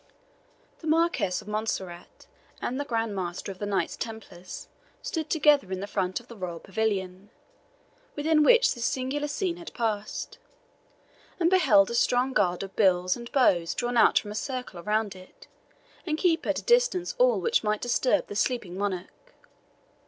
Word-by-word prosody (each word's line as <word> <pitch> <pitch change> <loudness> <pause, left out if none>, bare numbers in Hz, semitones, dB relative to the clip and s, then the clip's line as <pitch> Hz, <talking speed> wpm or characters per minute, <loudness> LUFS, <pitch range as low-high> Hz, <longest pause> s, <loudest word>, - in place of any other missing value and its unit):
The 320 - -8
Marquis 335 +3 +2 0.2
of - - -17
Montserrat 205 -5 -4 0.3
and 255 +3 -3
the 285 - -2
Grand 225 -5 -1
Master 180 +1 -4
of 185 - -11
the 205 - -3
Knights 200 -1 -1
Templars 200 -5 -8 0.4
stood 320 -2 -3
together 295 - +3
in 190 - -2
the 200 - -4
front 185 -2 -2
of 240 - -18
the 235 - -11
royal 180 -4 -5
pavilion, 195 -1 -3 0.9
within 305 +1 +2
which 480 +9 +5
this 235 - -6
singular 265 +4 -1
scene 345 +4 -2
had 345 - -9
passed, 215 -3 -3 1.0
and 340 0 +3
beheld 240 - +5
a - - -3
strong 250 +2 +2
guard 180 -4 +1
of 195 - -9
bills 185 -3 +3
and 235 -1 -9
bows 180 - +3
drawn 245 0 -2
out - - +5
to - - +5
form 205 - -8
a - - -5
circle 250 -4 -5
around 210 +2 -1
it, 185 0 -15 0.6
and 310 -3 -2
keep 335 -1 +1
at - - -1
distance 480 -7 +2
all - - +4
which 465 - +1
might 210 0 0
disturb 250 +4 +1
the 205 - -8
sleeping 205 -4 -1
monarch. 200 - -5
225 Hz, 165 wpm, -27 LUFS, 195-295 Hz, 1.0 s, which